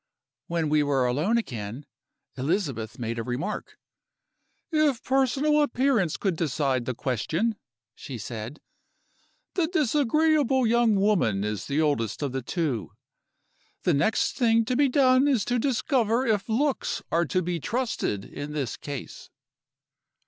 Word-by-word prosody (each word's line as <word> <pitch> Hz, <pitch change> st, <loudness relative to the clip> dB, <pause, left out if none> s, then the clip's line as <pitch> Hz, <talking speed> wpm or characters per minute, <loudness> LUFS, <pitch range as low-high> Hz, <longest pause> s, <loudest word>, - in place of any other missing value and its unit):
"When 165 Hz, -2 st, -1 dB
we 150 Hz, 0 st, +3 dB
were 140 Hz, -3 st, +1 dB
alone 150 Hz, -, +1 dB
again, 120 Hz, -, -5 dB, 0.5 s
Elizabeth 135 Hz, -, -2 dB
made 115 Hz, -1 st, -3 dB
a -, -, -2 dB
remark: 135 Hz, -, -4 dB, 0.9 s
'If 305 Hz, -6 st, +2 dB
personal 270 Hz, +3 st, +2 dB
appearance 250 Hz, -, +1 dB
could 190 Hz, -4 st, 0 dB
decide 140 Hz, -5 st, 0 dB
the 130 Hz, -, -3 dB
question,' 155 Hz, -, -1 dB, 0.4 s
she 130 Hz, -, -8 dB
said, 115 Hz, +5 st, -7 dB, 0.9 s
'the 350 Hz, -4 st, +1 dB
disagreeable 300 Hz, -, +2 dB
young 230 Hz, -1 st, +3 dB
woman 195 Hz, -, +2 dB
is 105 Hz, -2 st, -3 dB
the 145 Hz, +2 st, +1 dB
oldest 145 Hz, -5 st, 0 dB
of 140 Hz, -, -1 dB
the 135 Hz, +1 st, -3 dB
two. 130 Hz, -, -2 dB, 0.9 s
The 175 Hz, -, +3 dB
next 215 Hz, +10 st, +2 dB
thing 230 Hz, -3 st, +3 dB
to 255 Hz, -, -1 dB
be 280 Hz, +1 st, +3 dB
done 260 Hz, 0 st, +4 dB
is 255 Hz, -8 st, +2 dB
to 245 Hz, 0 st, 0 dB
discover 250 Hz, -1 st, +1 dB
if 215 Hz, -2 st, 0 dB
looks 270 Hz, +5 st, 0 dB
are 170 Hz, +1 st, +2 dB
to 185 Hz, +5 st, 0 dB
be 175 Hz, 0 st, -2 dB
trusted 225 Hz, -, -2 dB
in 145 Hz, +1 st, -7 dB
this 140 Hz, -6 st, -3 dB
case. 140 Hz, -3 st, -8 dB
185 Hz, 135 wpm, -26 LUFS, -, 0.9 s, done